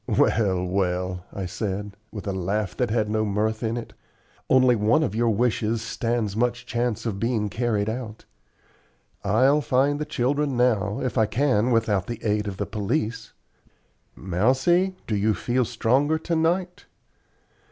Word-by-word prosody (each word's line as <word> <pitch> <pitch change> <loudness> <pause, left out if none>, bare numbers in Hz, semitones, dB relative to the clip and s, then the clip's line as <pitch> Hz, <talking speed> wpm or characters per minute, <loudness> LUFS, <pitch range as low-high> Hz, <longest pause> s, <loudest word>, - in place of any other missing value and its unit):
"Well, 95 -5 +2
well," 90 -1 -1
I 95 - -5
said, 100 +2 -4 0.2
with 105 - -7
a 100 - -1
laugh 95 +1 -2
that 125 - 0
had 110 -1 +1
no 110 +1 0
mirth 110 +2 -1
in 115 0 -1
it; 120 - -7 0.6
"only 130 -1 +5
one 110 +9 +3
of 105 - -1
your 115 +1 +1
wishes 115 0 0
stands 115 -3 -2
much 120 +1 0
chance 120 -1 -2
of 105 -4 -2
being 115 -2 0
carried 110 -2 -1
out. 110 -1 -5 1.0
I'll 130 +9 +3
find 140 +2 +1
the 150 - -2
children 140 -1 0
now 110 -3 +1
if 130 -2 -1
I 110 - +3
can 125 -1 +1
without 110 -5 +1
the 120 - -4
aid 105 -1 0
of 95 -2 -5
the 100 - -2
police. 110 +3 -3 0.8
Mousie, 130 - +1
do 110 - -1
you 105 +1 +2
feel 120 +7 0
stronger 130 +6 +1
to 165 +1 -2
night?" 175 +3 0
115 Hz, 155 wpm, -24 LUFS, 105-125 Hz, 1.0 s, only